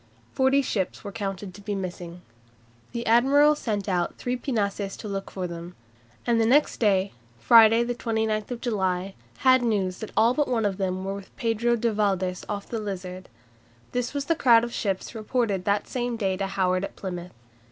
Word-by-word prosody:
Forty 265 +1 +3
ships 195 -7 -2
were 200 - -6
counted 195 -1 -5
to 205 - -12
be 205 0 -3
missing." 180 -2 -6 0.7
The 235 -1 -4
admiral 275 +6 +5
sent 215 -8 -3
out 180 -3 -1
three 250 0 -2
pinnaces 205 -6 -2
to 215 - -7
look 195 -1 -4
for 185 -2 -4
them, 170 0 -7 0.5
and 235 -1 +2
next 250 +7 +3
day, 200 -3 +2 0.3
Friday, 225 - +6
29 230 -2 -1
July 220 - 0
(19 245 -2 -5
July, 190 -6 0
O.S.), 195 0 -9 0.3
had 260 -1 +5
news 200 -6 0
that 220 - -6
all 230 +2 +5
but 295 +1 +1
one 230 -4 0
of 195 -2 0
them 190 -1 -2
were 195 - -2
with 200 -1 -10
Pedro 235 +1 +1
de 235 -1 0
Valdes 190 -3 0
off 200 -1 -4
the 230 - -3
Lizard. 185 -3 -6 0.6
This 245 -1 -1
was 280 -1 -1
the 330 - +2
crowd 235 -6 +5
of 235 0 -4
ships 195 -3 -2
reported 215 -4 -1
that 205 0 +1
same 245 -2 -2
day 195 -4 0
to 195 +1 -2
Howard 185 -1 0
at - - -5
Plymouth. 180 -2 -6
210 Hz, 190 wpm, -26 LUFS, 190-235 Hz, 0.7 s, Friday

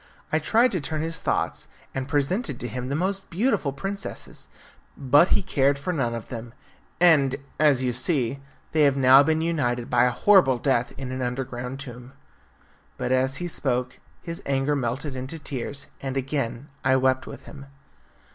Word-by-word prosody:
I 155 - +2
tried 230 +10 +3
to 180 -6 -1
turn 155 +2 -2
his 165 0 -1
thoughts, - - -1 0.3
and 130 -1 -3
presented 145 - 0
to 120 - -4
him 125 +2 -5
the 140 - -1
most 195 +4 -2
beautiful 195 - +1
princesses, 195 +7 -6 0.5
but 145 +5 +5
he - - +2
cared 140 -3 +2
for 160 +6 -3
none 120 -7 -1
of 115 - -7
them, 120 0 -7 0.4
and, 150 -7 +5 0.2
as 145 -4 +4
you 125 -1 0
see, 130 0 0 0.3
they 155 - +2
have 140 -2 +4
now 130 +1 +7
been 160 +2 +1
united 125 -8 -1
by 120 0 +4
a - - +4
horrible 135 0 +4
death 120 -2 +1
in 130 -1 -5
an 130 0 -4
underground 125 +1 -4
tomb." 125 -1 -9 0.8
But, - - -2
as 130 +1 +2
he 175 - -3
spoke, 125 -5 -2 0.2
his 170 0 -6
anger 140 +1 +1
melted 130 +2 -2
into 130 +5 -5
tears, 140 -1 -5 0.2
and 135 0 -3
again 135 -1 -3
I 130 0 +4
wept 130 0 +1
with - - -9
him. 140 -2 -11
135 Hz, 175 wpm, -25 LUFS, 125-155 Hz, 0.8 s, now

